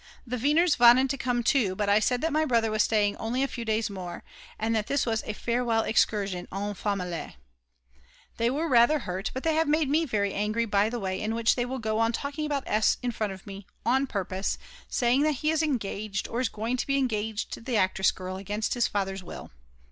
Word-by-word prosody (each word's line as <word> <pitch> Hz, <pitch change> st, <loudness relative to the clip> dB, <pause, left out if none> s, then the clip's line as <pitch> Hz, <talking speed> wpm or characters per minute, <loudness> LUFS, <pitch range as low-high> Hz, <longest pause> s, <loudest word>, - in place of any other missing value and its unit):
The 250 Hz, 0 st, -3 dB
Weiners 300 Hz, +5 st, +3 dB
wanted 245 Hz, +2 st, +7 dB
to 275 Hz, -, -2 dB
come 245 Hz, -1 st, 0 dB
too, 230 Hz, -7 st, +2 dB
but 205 Hz, +1 st, -1 dB
I 205 Hz, +1 st, +5 dB
said 250 Hz, +3 st, +1 dB
that 325 Hz, -1 st, 0 dB
my 310 Hz, +1 st, +3 dB
brother 230 Hz, -6 st, +1 dB
was 215 Hz, 0 st, +2 dB
staying 210 Hz, -2 st, +2 dB
only 245 Hz, +4 st, -1 dB
a -, -, +1 dB
few 240 Hz, -3 st, -6 dB
days 220 Hz, 0 st, 0 dB
more, 185 Hz, -3 st, -7 dB, 0.3 s
and 225 Hz, +1 st, 0 dB
that 215 Hz, -1 st, -1 dB
this 280 Hz, -1 st, +1 dB
was 225 Hz, -2 st, 0 dB
a 215 Hz, -, -2 dB
"farewell 235 Hz, 0 st, 0 dB
excursion 200 Hz, -4 st, 0 dB
en 205 Hz, +2 st, -3 dB
famille." 180 Hz, -4 st, -3 dB, 1.0 s
They 230 Hz, +1 st, +2 dB
were 300 Hz, +6 st, -1 dB
rather 245 Hz, +2 st, +5 dB
hurt, 190 Hz, -6 st, -4 dB
but 260 Hz, -, -5 dB
they 320 Hz, -, +2 dB
have 320 Hz, 0 st, +2 dB
made 305 Hz, -1 st, +2 dB
me 315 Hz, +3 st, +2 dB
very 205 Hz, -7 st, -1 dB
angry 215 Hz, +3 st, 0 dB
by 205 Hz, 0 st, +2 dB
the 240 Hz, +1 st, -4 dB
way 190 Hz, -2 st, -3 dB
in 220 Hz, +1 st, -1 dB
which 230 Hz, 0 st, +3 dB
they 245 Hz, -, 0 dB
will 260 Hz, +2 st, -4 dB
go 220 Hz, -2 st, -1 dB
on 225 Hz, +1 st, +2 dB
talking 290 Hz, +4 st, -3 dB
about 285 Hz, -3 st, -1 dB
S. 215 Hz, 0 st, +2 dB
in 245 Hz, -, 0 dB
front 215 Hz, -3 st, -2 dB
of 190 Hz, 0 st, -10 dB
me, 195 Hz, 0 st, -9 dB, 0.2 s
on 265 Hz, +3 st, +2 dB
purpose, 190 Hz, -3 st, -2 dB, 0.3 s
saying 250 Hz, +2 st, +2 dB
that 305 Hz, +1 st, +3 dB
he 305 Hz, +3 st, 0 dB
is 320 Hz, -1 st, +1 dB
engaged 215 Hz, -8 st, -2 dB
or 235 Hz, -, -3 dB
is 255 Hz, -, 0 dB
going 225 Hz, +4 st, -2 dB
to -, -, -3 dB
be 275 Hz, 0 st, +2 dB
engaged 220 Hz, -5 st, -1 dB
to -, -, -6 dB
the 235 Hz, 0 st, -1 dB
actress 190 Hz, 0 st, +3 dB
girl 185 Hz, 0 st, -5 dB
against 205 Hz, +3 st, -2 dB
his 240 Hz, -2 st, +2 dB
father's 195 Hz, -2 st, -3 dB
will. -, -, -9 dB
225 Hz, 230 wpm, -27 LUFS, 205-260 Hz, 1.0 s, wanted